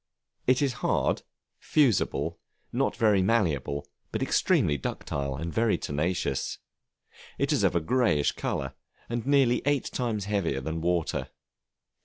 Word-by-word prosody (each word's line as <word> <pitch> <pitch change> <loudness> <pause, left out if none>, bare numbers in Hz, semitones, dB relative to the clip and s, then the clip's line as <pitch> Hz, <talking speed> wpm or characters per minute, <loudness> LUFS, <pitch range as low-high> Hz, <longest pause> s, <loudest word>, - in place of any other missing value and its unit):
It 130 +3 +4
is 135 -3 +1
hard, - - +1 0.4
fusible, 135 - +1 0.3
not - - +1
very 105 -4 +4
malleable, 80 - 0 0.2
but - - -1
extremely 75 - +2
ductile, 70 0 -3
and 80 +3 -5
very 115 +3 +2
tenacious; 80 +6 -1 0.8
it - - +1
is - - +2
of - - +3
a 85 - +3
greyish 110 - +2
color, 65 -1 -3 0.4
and 120 +1 -3
nearly 135 -4 +4
eight 145 0 0
times 115 -5 -1
heavier 100 -9 0
than 80 +4 -4
water. 85 -1 0
95 Hz, 130 wpm, -28 LUFS, 75-120 Hz, 0.8 s, It